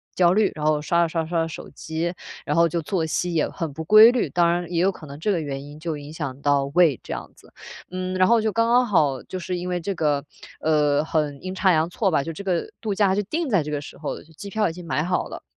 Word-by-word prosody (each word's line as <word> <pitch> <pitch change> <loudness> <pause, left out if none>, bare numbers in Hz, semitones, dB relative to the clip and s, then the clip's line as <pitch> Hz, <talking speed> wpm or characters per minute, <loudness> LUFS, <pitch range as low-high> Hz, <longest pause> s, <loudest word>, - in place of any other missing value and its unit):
焦 175 -1 +4
虑。 210 -1 +3
然 150 0 -4
后， 155 -1 +2
刷 170 +2 +2
着 165 - 0
刷 165 0 -1
着 - - -8
刷 170 -2 +1
着 - - -3
手 - - -8
机， 160 +2 -3 0.3
然 - - -1
后， 170 0 +5
就 170 +1 -1
作 165 +1 -1
息 175 +2 -1
也 155 - +2
很 165 -5 -4
不 160 +2 -5
规 215 +6 +8
律， 245 - 0
当 170 -1 +3
然 175 0 -2
也 170 0 +1
有 195 - +3
可 170 -4 -12
能 140 +1 -9
这 205 +6 0
个 175 - +1
原 140 -2 -5
因 145 +1 -11
就 160 -1 -3
影 145 +1 -9
响 140 -4 -5
到 140 -1 +2
胃 170 -7 +4
这 - - -5
样 - - -7
子。 - - -20 0.4
嗯， 185 0 -3
然 185 0 +4
后， 235 -1 +4
就 220 0 0
刚 230 0 +2
刚 245 +1 +4
好， 150 -9 +2
就 185 - -6
是， 180 0 -3
因 180 +1 -4
为 180 -1 -1
这 195 +4 -2
个， 150 -3 0 0.4
呃， 150 -2 +2
很 150 -2 -2
阴 185 0 -4
差 190 -1 +3
阳 160 +1 +2
错 195 +1 +1
吧， 140 -3 +2
就 165 - -5
这 200 - -8
个 180 -3 -1
度 210 -3 -2
假 200 -2 +3
就 205 - +1
定 320 - -2
在 195 -7 +3
这 150 - -6
个 145 - -1
时 - - -11
候， 150 - -4
就 160 - -21
机 200 +5 -9
票 215 -2 +1
已 160 - -6
经 175 0 -10
买 150 - 0
好 180 +1 -1
了。 - - -9
170 Hz, 310 characters per minute, -23 LUFS, 155-185 Hz, 0.4 s, 规